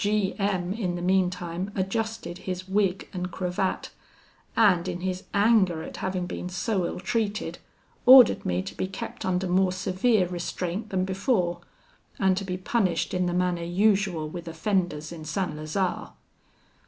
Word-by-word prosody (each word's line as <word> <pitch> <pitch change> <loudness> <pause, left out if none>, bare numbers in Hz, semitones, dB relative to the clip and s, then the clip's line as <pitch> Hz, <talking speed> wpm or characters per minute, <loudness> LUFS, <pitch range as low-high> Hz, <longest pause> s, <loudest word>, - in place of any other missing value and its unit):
"G 205 -1 +1
M 190 -2 0
in 190 -5 -2
the 175 - -4
meantime 180 0 0
adjusted 210 -1 -2
his 185 0 -4
wig 195 -1 0
and 180 -1 -3
cravat, 180 +1 -2 0.7
and 190 -5 +4
in 180 -1 -4
his 185 0 -3
anger 200 -6 +3
at - - -8
having 185 -1 -2
been 180 - -5
so 185 0 -1
ill - - -5
treated, 215 +1 -2 0.5
ordered 255 -3 +9
me 90 +1 -1
to - - -7
be - - -2
kept 190 - -6
under 185 0 0
more 185 +1 +2
severe 185 +3 +2
restraint 180 +3 -4
than 185 -1 0
before, 185 -3 0 0.6
and 190 -1 +3
to 195 - -2
be 180 -1 -3
punished 185 -3 0
in 180 -1 +1
the 175 - -1
manner 180 -1 +1
usual 190 -2 +1
with 170 +2 -7
offenders 165 -2 -1
in 165 -2 -8
St. 155 +3 -2
Lazare. 155 +5 -2
185 Hz, 155 wpm, -26 LUFS, 175-200 Hz, 0.7 s, ordered